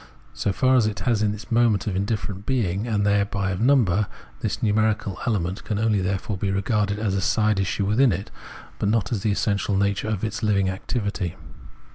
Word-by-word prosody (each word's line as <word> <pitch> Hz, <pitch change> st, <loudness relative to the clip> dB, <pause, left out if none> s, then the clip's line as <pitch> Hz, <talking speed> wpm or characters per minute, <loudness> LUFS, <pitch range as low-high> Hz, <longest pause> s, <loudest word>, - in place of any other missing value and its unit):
So 100 Hz, -, -1 dB
far 130 Hz, +5 st, +3 dB
as 115 Hz, -4 st, +3 dB
it 105 Hz, -, -4 dB
has 115 Hz, -4 st, +1 dB
in 105 Hz, -1 st, +1 dB
it 105 Hz, -, -10 dB
the -, -, -4 dB
moment 115 Hz, -3 st, +3 dB
of 100 Hz, -, -2 dB
indifferent 100 Hz, 0 st, -2 dB
being 110 Hz, -5 st, 0 dB
and 105 Hz, -3 st, 0 dB
thereby 100 Hz, -1 st, +1 dB
of 95 Hz, -, -3 dB
number, 110 Hz, -7 st, +3 dB, 0.3 s
this -, -, -3 dB
numerical 110 Hz, -2 st, +1 dB
element 95 Hz, -3 st, -1 dB
can 105 Hz, -, -2 dB
therefore 100 Hz, -1 st, 0 dB
only 100 Hz, -, -2 dB
be -, -, 0 dB
regarded 100 Hz, +1 st, 0 dB
as 105 Hz, -2 st, -1 dB
a 95 Hz, -, 0 dB
side 105 Hz, 0 st, +2 dB
issue 95 Hz, +1 st, 0 dB
within 115 Hz, +5 st, +4 dB
it, 95 Hz, +2 st, -4 dB, 0.5 s
but 100 Hz, -, +1 dB
not 105 Hz, -4 st, +1 dB
as 110 Hz, -5 st, -1 dB
the 105 Hz, -, +1 dB
essential 100 Hz, -1 st, 0 dB
nature 100 Hz, +1 st, 0 dB
of 105 Hz, -3 st, -2 dB
its 110 Hz, 0 st, -2 dB
living 100 Hz, -3 st, +2 dB
activity. 100 Hz, -2 st, -3 dB
105 Hz, 200 wpm, -24 LUFS, 100-110 Hz, 0.5 s, within